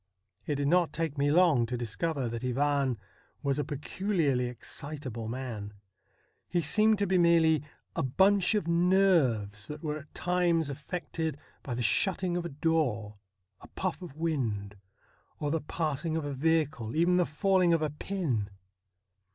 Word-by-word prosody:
It 150 - 0
did 140 0 0
not 175 +1 +3
take 160 -2 -2
me 145 +1 +3
long 155 -7 +4
to 125 +1 -3
dis 115 -3 -4
cover 160 -7 -1
that 115 +1 -5
Ivan 135 0 +1 0.5
was 140 0 0
a - - +1
peculiarly 150 -2 -1
excitable 125 -2 -6
man. 115 -4 -5 0.8
He 175 - +1
seemed 215 +7 +4
to 200 - +1
be 185 -1 +2
merely 165 -3 +4 0.3
a - - 0
bunch 190 - +3
of 205 -6 0
nerves 170 - +2
that 150 +1 -8
were 150 -1 -2
at 150 0 -16
times 175 -4 +1
affected 160 +1 -4 0.2
by 125 - -4
the 120 - -2
shutting 185 - +1
of 175 -1 -2
a - - -3
door, 135 -9 -1 0.4
a - - -14
puff 185 0 -3
of 175 -6 -9
wind, 115 -11 -2 0.6
or 145 -1 -1
the 165 0 0
passing 155 +1 -2
of 160 - -3
a 145 - -3
vehicle, 150 -5 0
even 175 +3 +3
the 180 - +4
falling 185 +2 +2
of 165 -2 +2
a 150 - -1
pin. 150 - -2
150 Hz, 160 wpm, -29 LUFS, 130-170 Hz, 0.8 s, long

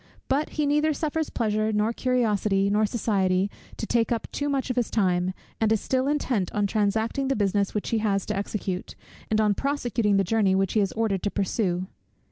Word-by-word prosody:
But 280 +3 +1
he 300 - +2
neither 300 +2 +2
suffers 315 +1 -1
pleasure, 215 -1 0
nor 215 +2 +1
curiosity, 210 -6 +1
nor 210 +1 +3
society, 195 -3 +1 0.3
to - - -3
take 230 +1 +1
up 230 -2 -1
too 290 0 -2
much 270 -2 -1
of - - -3
his 245 -3 0
time, 185 -3 +1 0.3
and 220 -1 +2
is 220 - +3
still 260 +4 0
intent 260 -10 0
on 205 -1 +1
transacting 220 +6 0
the 270 - +1
business 200 -1 0
which 210 - -2
he 225 - +1
has 200 -3 0
to 210 - -2
execute, 195 -2 -3 0.3
and 215 - +2
on 210 -1 +3
prosecuting 240 -5 0
the 195 - +3
journey 195 -1 +2
which 195 -1 +1
he 220 - +3
is 195 -2 +1
ordered 220 -4 0
to 205 - 0
pursue. 185 -2 -1
215 Hz, 200 wpm, -26 LUFS, 200-245 Hz, 0.3 s, nor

